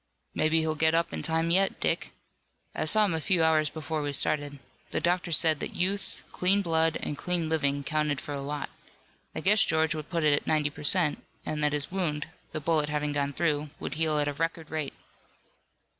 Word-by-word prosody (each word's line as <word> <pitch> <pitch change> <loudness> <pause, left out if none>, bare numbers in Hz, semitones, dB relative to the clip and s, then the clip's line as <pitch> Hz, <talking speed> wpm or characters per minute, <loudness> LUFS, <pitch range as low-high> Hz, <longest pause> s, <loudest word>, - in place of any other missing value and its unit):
"Maybe 160 +1 +2
he'll 160 0 0
get 160 +1 +3
up 165 0 0
in - - -3
time 165 +1 +1
yet, 195 +2 +2
Dick. - - -1 0.6
I - - -2
saw 215 -1 +4
him 195 - 0
a 160 - -2
few 175 0 +2
hours 155 -2 +3
before 155 0 -4
we 145 -1 -3
started. 145 0 +2 0.3
The - - -1
doctors 175 -2 +2
said 160 -3 +3
that - - -5
youth, 195 +3 -2
clean 195 +2 +2
blood 165 -2 +1
and 150 - -3
clean 170 +1 -2
living 140 -3 0
counted 150 -1 0
for 145 - -6
a 140 - -4
lot 145 +1 -4 0.6
I - - -3
guess 205 +1 +4
George 160 0 +1
would 155 -1 -6
put 170 -3 -1
it 150 -1 +4
at 145 - -1
ninety 150 -2 +1
per 145 - -10
cent, 155 0 +2 0.2
and 155 -1 -3
that 150 0 +2
his 145 +1 -1
wound, 165 -6 -1 0.3
the - - -3
bullet 150 -1 +1
having 150 0 -1
gone 140 0 -1
through, 150 -2 0
would - - -4
heal 155 0 +1
at 145 -1 +2
a 145 - -1
record 165 +1 -3
rate." 155 -3 -3
155 Hz, 210 wpm, -28 LUFS, 150-165 Hz, 0.6 s, saw